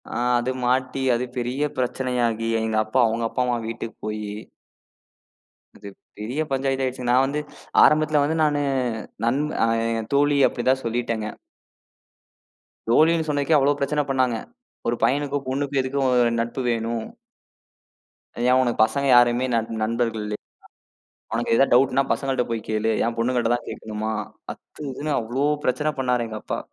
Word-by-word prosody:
ஆ - - -3 0.2
அது 120 +2 -1
மாட்டி, 130 +2 0
அது 120 +2 -1
பெரிய 125 +4 -1
பிரச்சனையாகி. 125 -3 -1
எங்க 110 0 -1
அப்பா, 110 +5 0
அவங்க 115 +1 -2
அப்பா 125 - -2
அம்மா 120 -1 0
வீட்டுக்கு 115 0 -6
போயி 105 -1 -4 1.5
அது 100 - -11 0.3
பெரிய 120 +8 -3
பஞ்சாயத்தாயிடுச்சு. 135 -1 -1
நான் 130 +2 +5
வந்து 140 +2 -2 0.4
ஆரம்பத்துல 155 -1 +4
வந்து 155 +3 0
நானு 145 -1 +2 0.6
நண்ப 140 +6 +1 0.2
அ - - +1 0.5
தோழி 145 +1 +3
அப்டிதான் 130 +2 0
சொல்லிட்டேங்க. 115 -2 -2 1.6
தோழினு 160 +6 +4
சொன்னதுக்கே 145 +1 +1
அவ்வளவு 145 +1 +2
பிரச்சன 150 +2 0
பண்ணாங்க. 130 -3 +1 0.5
ஒரு 120 - +1
பையனுக்கும் 140 0 -1
பொண்ணுக்கும் 140 +1 0
எதுக்கு 130 +2 -2
அ 130 - +3 0.3
நட்பு 120 +3 -3
வேணும்? 115 -1 -1 1.4
ஏன் 125 +1 +4
ஒனக்கு 120 -3 +1
பசங்க 140 +5 0
யாருமே 120 +1 +4
நண் 115 -1 0
நண்பர்கள் 115 0 -1
இல்லையா? 105 0 -4 0.9
ஒனக்கு 115 0 0
ஏதாவது 135 +1 +4
டவுட்ன்னா 135 +2 +4
பசங்கள்ட்ட 135 -2 0
போய் 115 -1 -2
கேளு. 110 +1 +1
ஏன் 115 0 -1
பொண்ணுங்கள்ட்ட 120 0 +1
தான் 120 - -7
கேக்கணுமா? 110 0 -4 0.4
அத்து 150 - -11
இதுன்னு 145 +4 -4
அவ்ளோ 120 +5 -1 0.2
பிரச்சன 150 +4 +1
பண்ணாரு 125 -2 +1
எங்க 110 -1 -6
அப்பா. - - -3
125 Hz, 140 wpm, -23 LUFS, 115-140 Hz, 1.6 s, நான்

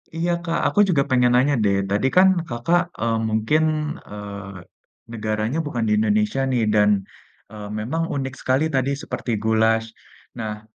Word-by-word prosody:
Iya, 170 +2 0
Kak, 165 -1 -1
aku 205 - 0
juga 140 -5 +3
pengen 125 -1 +3
nanya 140 +3 +3
deh, 100 -1 +2
tadi 105 +6 +1
kan 190 +1 +8 0.2
Kakak, 165 +10 +1 0.2
eee, 115 -1 +1
mungkin, 110 +9 +1 0.5
eee, 100 -3 -8 0.5
negaranya 110 +5 -2
bukan 120 -5 -2
di 105 - +2
Indonesia 105 +4 +1
nih, 120 -3 +1
dan, 105 -1 +4 0.6
eee, 105 -1 -8
memang 160 +10 -2
unik 135 -1 -3
sekali 130 +4 +1
tadi 135 +1 +1
seperti 120 - -4
goulash. 110 0 +2 0.5
Nah, 105 -1 -5
115 Hz, 150 wpm, -22 LUFS, 105-135 Hz, 0.6 s, kan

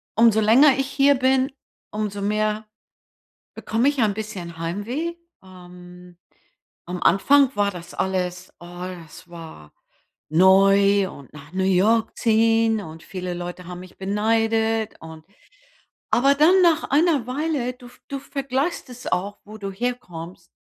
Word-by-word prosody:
umso 225 -1 +4
länger 260 +7 +6
ich 270 -1 -1
hier 280 0 +3
bin, 260 +1 +1 0.4
umso 210 -1 -3
mehr 215 +1 -1 0.9
bekomme 230 +5 0
ich 285 -2 -4
ein 210 -2 +2
bisschen 195 -6 -7
Heimweh. 225 - -4 0.3
Ähm, 180 -1 -14 0.7
am 180 +1 -6
Anfang 275 +9 +4
war 205 -1 +1
das 175 -2 -10
alles 180 -1 -3
oh, 175 - -12 0.4
das 160 +3 -15
war 160 - -12 0.6
neu 195 +3 +4
und 140 -7 -13
nach 150 +2 -13
New 190 0 -1
York 215 +5 +2
ziehen, 225 -1 +2
und 160 -3 -10
viele 185 -2 -5
Leute 175 +1 -7
haben 180 0 -7
mich 185 -1 -14
beneidet 225 +2 0
und 160 -1 -11 0.9
aber 275 +3 +4
dann 325 +7 +5
nach 330 -2 +2
einer 295 -4 +2
Weile, 275 -2 -2
du 250 0 -15
v 245 - -20
du 275 - -4
vergleichst 275 +3 -3
es 250 0 -11
auch, 200 +3 -2
wo 215 +1 -11
du 200 -2 -5
herkommst, 180 -7 -6
210 Hz, 140 wpm, -22 LUFS, 180-250 Hz, 0.9 s, länger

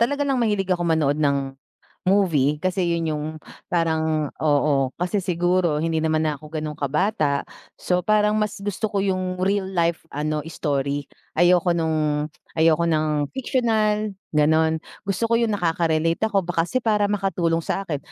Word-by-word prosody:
Talaga 285 +5 +1
lang 270 -3 0
mahilig 205 -4 0
ako 175 -1 -1
manood 155 -2 +1
ng 140 -2 +1 0.5
movie 155 -7 +2
kasi 185 0 0
'yon 170 -1 0
yung 150 - -4 0.4
parang 160 -3 0
oo. 145 -3 +2
Kasi 180 +4 -2
siguro, 175 -3 +1
hindi 165 0 0
naman 155 0 +1
na 150 -2 -1
'ko 155 +1 -13
ganon 155 -1 -4
kabata, 150 0 0 0.3
so 180 0 -1
parang 210 0 +3
mas 210 -2 -2
gusto 205 +1 -2
ko 200 - +1
yung 185 -1 -1
real 195 +1 +1
life, 170 -3 -1
ano, 150 +1 -2
story. 145 -3 -2 0.2
Ayoko 175 0 +4
nung 155 -2 0 0.2
ayoko 165 +1 +3
ng 155 -2 +1
fictional, 215 -5 0 0.2
ganon. 160 +1 +3 0.2
Gusto 200 +3 -1
ko 230 - 0
'yon 230 -1 +2
nakaka-relate 165 -3 0
ako 195 -4 +1
ba 170 -1 0
kasi 215 +10 -1
para 210 -4 +1
makatulong 175 -5 0
sa 195 - -1
akin. 165 -7 -3
170 Hz, 155 wpm, -23 LUFS, 155-195 Hz, 0.5 s, Ayoko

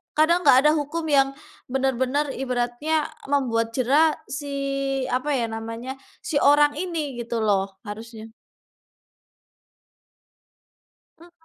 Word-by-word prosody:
kadang 315 +3 +4
nggak 255 - +8
ada 300 - +6
hukum 295 +3 -3
yang 275 -1 +4 0.4
bener-bener, 265 +2 0
ibaratnya 260 +4 -1 0.2
membuat 230 -5 0
jera 290 +5 +3 0.2
si 285 +1 -5 0.6
apa 265 +3 0
ya 240 -3 0
namanya, 230 +3 -5 0.3
si - - -4
orang 290 +1 +5
ini 345 -2 -3 0.2
gitu 235 -1 -2
loh. 195 -2 +1
Harusnya 220 +1 -8 2.9
Mhm. 345 +1 -17
265 Hz, 105 wpm, -24 LUFS, 230-295 Hz, 2.9 s, nggak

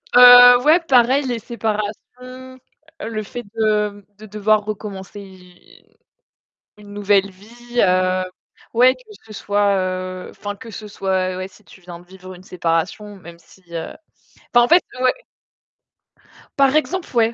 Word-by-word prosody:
Heu, 245 0 +9
ouais, 320 +4 +5
pareil, 260 +2 +3
les 240 -2 -3
séparations, 215 -2 -4 1.0
heu, - - -5
le 215 -1 -4
fait 240 +4 -8
de, 210 -1 +1
mmh, 205 -1 -16
de 215 - -13
devoir 215 0 0
recommencer 205 -1 -7
une 180 -2 -19 0.8
une 205 -1 -14
nouvelle 200 -1 +1
vie, 240 +5 -6
heu, 185 0 +1 0.5
ouais, 250 +2 +4
que 450 -4 -18
ce 215 - -12
soit, 205 -1 0
heu, 185 0 -4
enfin, 205 0 -7
que 225 +3 -12
ce 215 0 -9
soit, 185 -2 -2
ouais, 185 +1 -6
si 200 +2 -23
tu 190 - -18
viens 175 -1 -11
de 175 - -19
vivre 185 0 -13
une 180 - -16
séparation, 180 +4 -3
même 170 -2 -14
si, 190 - -22
heu, 165 -1 -5 0.6
enfin, 240 0 +6
en - - -2
fait 345 +2 +5 0.2
ouais. 260 - 0 1.4
Par 275 +1 +3
exemple, 345 +4 -1
ouais. 230 0 +2
205 Hz, 155 wpm, -19 LUFS, 185-240 Hz, 1.4 s, Heu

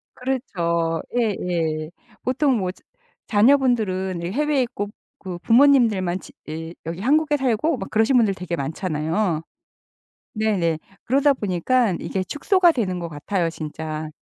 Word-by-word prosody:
그렇죠. 170 - -1
예예. 170 -9 -1 0.3
보통 260 0 +2
뭐 185 -3 -1 0.6
자녀분들은 210 -6 +2
이 - - -2
해외에 295 +2 +1
있고 205 -4 -4 0.3
그 185 -3 -6
부모님들만 230 -7 +4
지 - - -13 0.2
예 160 +2 -6
여기 170 +3 -5
한국에 295 +4 +3
살고 265 +4 +1
막 195 - -6
그러신 220 +4 +2
분들 220 -4 +3
되게 180 -2 -4
많잖아요. 160 +3 -1 0.9
네네 190 -7 +1 0.3
그러다 280 +3 +4
보니까 215 0 +1
이게 190 - -2
축소가 345 - +3
되는 190 - -1
것 170 - -4
같아요 165 +3 -2
진짜. 155 0 -5
195 Hz, 285 characters per minute, -23 LUFS, 170-255 Hz, 0.9 s, 부모님들만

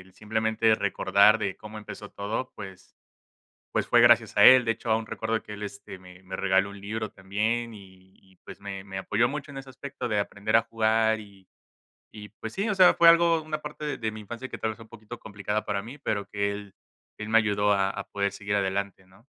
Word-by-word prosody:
el 95 0 -18
simplemente 110 +1 +1
recordar 100 +1 +3
de 100 -3 -3
cómo 105 0 -10
empezó 105 0 -9
todo, 110 +6 -4
pues 95 -3 -11 0.8
pues, - - 0
fue - - +4
gracias - - +5
a - - +8
él. 130 -1 +8
De 115 - 0
hecho, 115 0 -3
aún 110 0 +1
recuerdo 110 0 -3
que 105 - -10
él, 105 0 -8
este, 100 -2 -8
me 90 0 -15
me 95 0 -9
regaló 95 0 +1
un 100 -1 -11
libro 110 +1 -4
también 110 +4 -2
y 95 -1 -16
y, 95 -1 -25
pues, - - -11
me 100 -1 -7
me 95 -1 -6
apoyó 115 +5 +1
mucho 145 0 -6
en 135 - -8
ese 135 0 -10
aspecto 130 0 -7
de 105 -1 0
aprender 100 +2 0
a 115 - +4
jugar 110 0 +1
y 100 -3 -16 0.7
y, 105 -1 -10
pues, 110 +1 -9
sí 205 +3 -1
o 210 - +1
sea 185 -1 +6
fue 170 - +6
algo, 170 -1 +5
una 155 0 -4
parte 150 -1 -5
de 110 -1 -2
mi 110 - -8
infancia 120 +5 -8
que - - -8
tal 110 - -1
vez 110 - -7
fue 115 - -13
un - - -21
poquito 115 +1 -11
complicada 105 0 -4
para 100 -1 -2
mí 125 +7 -10
pero 100 -7 -2
que 100 0 -1
él 100 -1 -9 0.4
él 105 0 -6
me 115 - +5
ayudó 105 -2 +2
a 100 -1 +1
a - - -5
poder 100 -1 -1
seguir 100 +1 -4
adelante, 95 -1 -2
¿no? 95 +6 -23
105 Hz, 230 wpm, -26 LUFS, 100-115 Hz, 0.8 s, a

